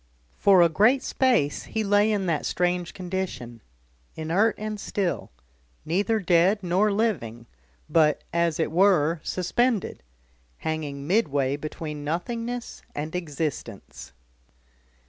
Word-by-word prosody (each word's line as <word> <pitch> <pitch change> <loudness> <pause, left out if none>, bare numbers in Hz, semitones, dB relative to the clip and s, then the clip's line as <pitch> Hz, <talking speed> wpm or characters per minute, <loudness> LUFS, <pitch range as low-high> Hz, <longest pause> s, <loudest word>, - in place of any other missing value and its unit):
For 190 -3 +5
a - - +6
great 220 +10 +3
space 240 - +1
he 220 - -2
lay 205 +1 +3
in 200 -3 0
that 165 -4 0
strange 180 -1 -1
condition, 180 - -5 0.5
inert 175 +8 +1
and 215 0 -5
still 195 -3 -2 0.6
neither 200 +7 +1
dead 185 +2 +3
nor 185 +4 +2
living 145 - -1 0.4
but, 155 -2 +3
as 170 -2 +1
it 160 - 0
were, 170 -3 +3
suspended, 220 +7 -1 0.6
hanging 150 -3 -4
midway 145 -8 +1
between 150 0 -6
nothingness 230 +10 -4
and 155 +3 -4
existence. 150 - -5
175 Hz, 110 wpm, -25 LUFS, 155-205 Hz, 0.6 s, a